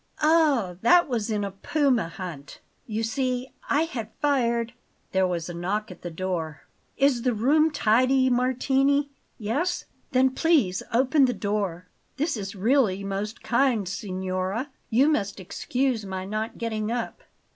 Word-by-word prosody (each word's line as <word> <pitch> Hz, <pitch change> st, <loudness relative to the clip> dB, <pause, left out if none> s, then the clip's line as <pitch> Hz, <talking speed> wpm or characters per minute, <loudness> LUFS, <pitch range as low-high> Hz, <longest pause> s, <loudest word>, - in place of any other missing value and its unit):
"Ah, 295 Hz, -, +3 dB
that 350 Hz, +9 st, +5 dB
was 235 Hz, -5 st, -2 dB
in 210 Hz, -2 st, 0 dB
a 200 Hz, -, -3 dB
puma 245 Hz, -, +1 dB
hunt. 165 Hz, -5 st, -8 dB, 0.3 s
You 220 Hz, 0 st, -2 dB
see, 255 Hz, +2 st, -1 dB, 0.2 s
I 295 Hz, +3 st, +3 dB
had 245 Hz, -10 st, -5 dB
fired 235 Hz, -5 st, +1 dB, 0.2 s
" -, -, -42 dB
There 190 Hz, 0 st, +2 dB
was 170 Hz, -2 st, -3 dB
a 175 Hz, -, -6 dB
knock 190 Hz, +5 st, -2 dB
at 180 Hz, -, -12 dB
the 175 Hz, -, -5 dB
door. 165 Hz, -3 st, -4 dB, 0.3 s
"Is 275 Hz, -3 st, +3 dB
the 250 Hz, -1 st, +1 dB
room 300 Hz, +8 st, +4 dB
tidy, 260 Hz, 0 st, +3 dB
Martini? 270 Hz, +3 st, +2 dB, 0.3 s
Yes? 285 Hz, -, -1 dB, 0.3 s
Then 260 Hz, 0 st, +4 dB
please 265 Hz, -, +2 dB
open 265 Hz, +4 st, +4 dB
the 250 Hz, -, +1 dB
door. 200 Hz, -4 st, -2 dB, 0.3 s
This 310 Hz, +2 st, 0 dB
is 200 Hz, -2 st, -5 dB
really 205 Hz, -2 st, +2 dB
most 200 Hz, +3 st, -4 dB
kind, 235 Hz, -4 st, +2 dB
signora; 190 Hz, +5 st, -3 dB, 0.2 s
you 250 Hz, +5 st, +4 dB
must 205 Hz, -10 st, 0 dB
excuse 245 Hz, +5 st, -1 dB
my 190 Hz, -1 st, -5 dB
not 215 Hz, +3 st, -3 dB
getting 220 Hz, -2 st, -2 dB
up." 240 Hz, -1 st, -3 dB
230 Hz, 150 wpm, -26 LUFS, 195-265 Hz, 0.3 s, that